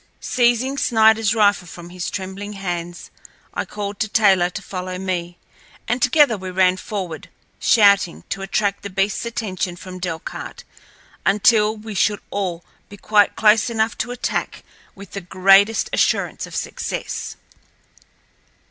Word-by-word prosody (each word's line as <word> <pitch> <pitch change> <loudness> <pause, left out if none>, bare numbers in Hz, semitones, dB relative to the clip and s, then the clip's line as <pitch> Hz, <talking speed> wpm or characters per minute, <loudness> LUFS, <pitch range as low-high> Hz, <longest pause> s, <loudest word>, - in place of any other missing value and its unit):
Seizing 245 +2 +1
Sniderl's 220 -2 +3
rifle 205 -4 +3
from 175 +1 -11
his 180 0 -4
trembling 195 +2 -6
hands, 175 -3 -5 0.4
I - - -2
called 205 -1 -6
to 220 - 0
Taylor 195 -5 +3
to 205 - -7
follow 185 0 -5
me, 175 -2 -4 0.5
and 240 +2 -1
together 250 -4 +4
we 185 0 -6
ran 185 0 +2
forward, 185 -5 -6 0.3
shouting, 200 -6 +4
to 195 - -4
attract 200 +1 -1
the 200 - -6
beastl's 195 +4 -1
attention 190 -6 -3
from 185 0 -9
Delcarte 170 -3 -6 0.6
until 215 +1 +3
we 215 0 -8
should 205 +1 +1
all 180 -4 -3 0.2
be 205 - -11
quite 205 0 +3
close 220 +2 +4
enough 225 -1 0
to - - -2
attack 245 0 -3 0.3
with 195 -1 -12
the 200 - -5
greatest 195 +4 +4
assurance - - 0
of - - -10
success. - - -4
200 Hz, 140 wpm, -21 LUFS, 185-220 Hz, 0.6 s, together